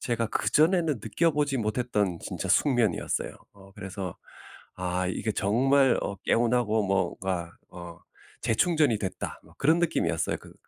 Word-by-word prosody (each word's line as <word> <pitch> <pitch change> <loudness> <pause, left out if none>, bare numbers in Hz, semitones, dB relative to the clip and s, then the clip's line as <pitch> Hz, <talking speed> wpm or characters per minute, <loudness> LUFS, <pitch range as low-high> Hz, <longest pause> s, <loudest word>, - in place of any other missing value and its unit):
제가 115 -2 -1
그전에는 160 - +2
느껴보지 145 +3 +1
못했던 105 -5 -1
진짜 - - -5
숙면이었어요. 120 - +1 0.2
어 95 -1 -17
그래서 95 -3 -6 0.6
'아 90 0 -2
이게 110 +4 -2
정말 130 +6 +3
어 100 - -3
개운하고 115 -3 +2
뭐가 95 -3 -1 0.2
어 85 -1 -10 0.4
재충전이 125 0 +2
됐다.' 95 -2 -5
뭐 - - -20
그런 160 +5 +3
느낌이었어요 85 - 0
그 - - -15
110 Hz, 305 characters per minute, -27 LUFS, 95-135 Hz, 0.6 s, 정말